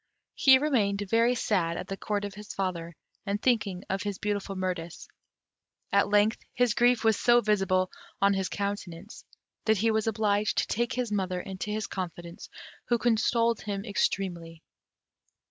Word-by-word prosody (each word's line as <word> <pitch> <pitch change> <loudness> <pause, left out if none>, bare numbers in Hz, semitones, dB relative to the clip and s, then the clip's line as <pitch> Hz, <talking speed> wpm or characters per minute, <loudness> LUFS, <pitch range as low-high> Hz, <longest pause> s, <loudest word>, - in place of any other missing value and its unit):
He 265 -1 +6
remained 215 -9 +1
very 230 +4 +3
sad 175 -8 0
at 180 - -5
the 195 - -4
Court 205 +1 -2
of 200 - -6
his 210 +1 -9
father, 170 -3 -3 0.3
and 205 0 -2
thinking 210 -7 0
of 195 0 -2
his 205 -2 -3
beautiful 205 -1 -3
Mirtis. 180 -3 -4 0.8
At 200 0 +3
length 210 +2 +3 0.2
his 245 -3 +3
grief 240 0 +3
was 220 -2 +3
so 240 0 +5
visible 195 -4 +1 0.3
on 200 0 +4
his 190 -1 -1
countenance, 200 -1 -5 0.4
that 220 -1 +3
he 225 +3 +2
was 220 0 0
obliged 210 -1 +1
to - - +2
take 235 +1 -1
his 245 -3 -2
mother 185 -3 -1
into 190 +2 -6
his 215 0 -2
confidence, 175 -2 -7 0.4
who 240 - +2
consoled 230 0 +2
him 200 -1 -4
extremely. 175 -5 -2
205 Hz, 160 wpm, -28 LUFS, 185-220 Hz, 0.8 s, He